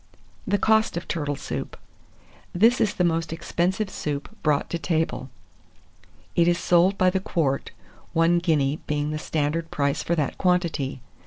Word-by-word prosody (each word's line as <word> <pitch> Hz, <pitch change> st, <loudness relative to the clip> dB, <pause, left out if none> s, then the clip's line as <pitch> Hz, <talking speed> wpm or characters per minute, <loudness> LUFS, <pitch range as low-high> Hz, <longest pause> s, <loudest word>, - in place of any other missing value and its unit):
THE 205 Hz, +1 st, +2 dB
COST 220 Hz, -2 st, +2 dB
OF 170 Hz, -, -5 dB
TURTLE 145 Hz, -3 st, -2 dB
SOUP. -, -, -5 dB, 0.8 s
This 230 Hz, +7 st, +4 dB
is 210 Hz, -, +1 dB
the 180 Hz, -, +1 dB
most 165 Hz, -2 st, 0 dB
expensive 185 Hz, +4 st, -1 dB
soup 145 Hz, -4 st, -4 dB
brought 150 Hz, -2 st, +1 dB
to 170 Hz, -, -1 dB
table. 160 Hz, -5 st, -1 dB, 1.1 s
It 170 Hz, -1 st, +4 dB
is 175 Hz, 0 st, +3 dB
sold 180 Hz, +4 st, +3 dB
by 185 Hz, 0 st, +4 dB
the 190 Hz, -, 0 dB
quart, 150 Hz, -7 st, -1 dB, 0.4 s
one 165 Hz, +1 st, +3 dB
guinea 155 Hz, -4 st, +1 dB
being 150 Hz, 0 st, -1 dB
the 155 Hz, -, -3 dB
standard 160 Hz, +2 st, -1 dB
price 140 Hz, -2 st, 0 dB
for 170 Hz, -, 0 dB
that 150 Hz, -4 st, -2 dB
quantity. 170 Hz, -8 st, 0 dB
165 Hz, 155 wpm, -25 LUFS, 150-180 Hz, 1.1 s, This